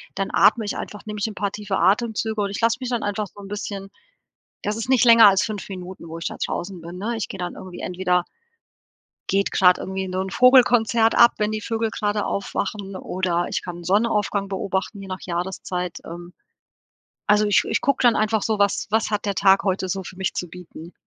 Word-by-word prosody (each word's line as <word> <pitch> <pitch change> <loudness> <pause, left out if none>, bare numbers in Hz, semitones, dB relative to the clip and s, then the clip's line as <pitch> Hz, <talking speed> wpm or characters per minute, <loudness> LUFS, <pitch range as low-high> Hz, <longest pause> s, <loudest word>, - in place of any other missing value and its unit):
Dann 195 - -2
atme 220 +1 +4
ich 205 - -3
einfach, 210 - -7
nehme 210 -1 -6
ich 205 - 0
'n 215 - -7
paar 200 0 -2
tiefe 205 -2 -3
Atemzüge 220 +2 +1
und 200 - -1
ich 200 - -5
lasse 230 0 +2
mich 255 - -3
dann 240 -2 -1
einfach 205 +1 -2
so 205 - -17
'n 200 - -10
bisschen 200 -1 -5 0.7
das 210 +1 -2
ist 225 +3 -4
nicht 255 -2 +5
länger 230 -1 +9
als 195 0 +3
5 215 -3 -5
Minuten, 185 -2 -8
wo 165 +1 -7
ich 165 - -5
da - - -4
draußen 180 0 -4
bin, 170 +2 -8
ne? 230 +5 -2
Ich 225 - -3
gehe 195 - -7
dann 180 -1 -4
irgendwie 185 -1 -9
entweder 180 -1 0 1.1
geht 195 0 +1
grad 180 -1 +5
irgendwie 190 0 -4
so 185 - -3
'nen 190 0 -3
Vogelkonzert 240 -2 +5
ab, 235 0 +6
wenn 210 0 0
die 215 - -2
Vögel 225 +1 -2
gerade 210 -1 -1
aufwachen 200 0 -3
oder 180 -2 -1
ich - - -2
kann 175 -1 -8
Sonnenaufgang 205 0 +1
beobachten 195 +1 -3
je - - -8
nach 185 0 -5
Jahreszeit. 180 0 -4
Ähm, 175 +1 -9 1.0
also 210 0 +4
ich 205 -2 +3
ich - - 0
gucke 280 - +1
dann 240 -2 +5
einfach 215 0 +1
so: 220 -2 -1
Was 200 -1 +1
was 220 0 +1
hat 210 -1 -1
der 200 -1 -1
Tag 195 0 +4
heute 190 -1 -1
so 190 +1 -2
für 185 - -9
mich 190 0 -2
zu 180 - -4
bieten? 175 -1 -11
200 Hz, 215 wpm, -22 LUFS, 185-215 Hz, 1.1 s, länger